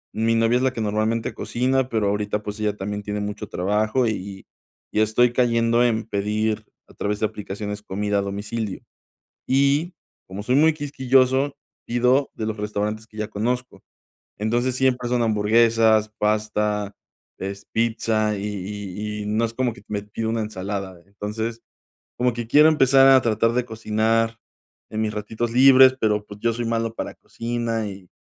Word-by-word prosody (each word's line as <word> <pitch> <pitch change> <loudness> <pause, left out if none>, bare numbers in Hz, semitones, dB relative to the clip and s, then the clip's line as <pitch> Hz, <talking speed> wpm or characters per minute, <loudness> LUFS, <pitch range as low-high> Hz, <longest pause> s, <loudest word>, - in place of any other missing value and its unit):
Mi 115 +1 +2
novia 115 +2 +3
es 125 - -1
la 130 -1 +1
que 115 - -4
normalmente 110 +2 -1
cocina, 130 +1 0
pero 110 -3 0
ahorita, 105 +1 -1
pues, 105 +1 -6
ella 105 -1 0
también 105 +1 -4
tiene 105 0 -3
mucho 105 0 -5
trabajo, 110 +6 +1
y - - +1
y 95 -1 -8 0.5
y - - +3
estoy 120 +3 +3
cayendo 115 -1 +3
en 115 -2 +1
pedir 105 +1 -1 0.2
a - - -18
través 105 0 -2
de 110 - +1
aplicaciones 105 0 -5
comida 105 0 -1
a - - +1
domicilio, 100 +1 -4 0.6
y 140 +6 +2 0.3
como 95 +2 -7
soy 125 +3 +1
muy 155 +2 +5
quisquilloso, 135 -1 +2 0.3
pido 125 +3 +2
de 110 - -3
los 110 0 -3
restaurantes 105 +1 -3
que 110 - -21
ya 105 +1 -3
conozco. 120 -1 -3 0.6
Entonces 120 +4 0
siempre 130 -2 +1
son 125 -1 +1
hamburguesas, 110 0 +3
pasta, 105 -1 0 0.4
es 100 +1 -6
pizza, 110 -2 0
y 100 - -5
y 105 +1 -5
y - - -7
no 110 +2 +1
es 115 - -5
como 130 0 0
que - - -15
t - - -31
me 105 -1 -2
pido 110 +2 -4
una 115 -1 -1
ensalada. 95 -3 -5
Entonces, 110 +3 -5 0.6
como 125 0 +2
que 115 -1 -5
quiero 150 +4 +7
empezar 135 -3 +5
a 135 -1 +7
tratar 115 0 +2
de 125 +1 0
cocinar 110 0 0 0.5
en 110 - -3
mis 105 -1 -2
ratitos 110 +2 -3
libres, 130 +1 +7
pero, 105 -1 +1
pues, 105 0 -11
yo 115 +1 +1
soy 120 +1 -3
malo 115 0 -1
para - - -4
la - - -14
cocina, 115 -2 -3
y 95 -2 -10
110 Hz, 175 wpm, -23 LUFS, 105-120 Hz, 0.6 s, quiero